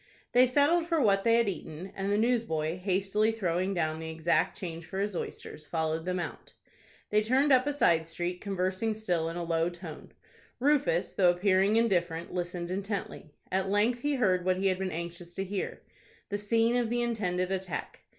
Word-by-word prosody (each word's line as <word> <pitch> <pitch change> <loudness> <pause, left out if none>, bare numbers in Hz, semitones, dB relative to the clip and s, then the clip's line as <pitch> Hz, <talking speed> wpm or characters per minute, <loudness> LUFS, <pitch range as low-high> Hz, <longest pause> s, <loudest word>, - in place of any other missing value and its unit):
They 250 +1 +6
settled 295 +6 +3
for 335 -2 +1
what 200 -6 +3
they 230 0 +4
had 235 -1 +3
eaten, 180 -1 -5
and 195 +1 -2
the 205 - +2
newsboy, 210 -9 0
hastily 195 +3 +1
throwing 185 -3 -1
down 155 -2 -1
the 160 0 -5
exact 160 +2 +1
change 170 -2 -6
for 190 - -7
his 200 0 -1
oysters, 155 -2 -6
followed 160 0 -1
them 180 0 -1
out. 170 - -6 0.6
They 210 0 +4
turned 260 +6 +2
up 260 +1 +5
a - - +2
side 170 - +2
street, 175 +2 -4
conversing 195 +2 -1
still 175 -7 -1
in 165 - -5
a 175 - -2
low 165 0 +1
tone. 175 -3 -10 0.5
Rufus, 275 - +2
though 180 -2 +4
appearing 190 +3 +3
indifferent, 175 -7 +1
listened 175 -1 -3
intently. 195 -4 -4 0.2
At 190 +1 0
length 220 +4 +2
he 290 +1 0
heard 185 -8 +2
what 185 0 +1
he 195 +1 +2
had 185 0 -1
been 190 -1 -1
anxious 170 +1 -6
to 195 - -2
hear,—the 200 +1 -6
scene 225 +3 +2
of 240 -2 0
the 240 +1 0
intended 185 -6 -1
attack. 185 -5 -4
190 Hz, 185 wpm, -29 LUFS, 175-225 Hz, 0.6 s, They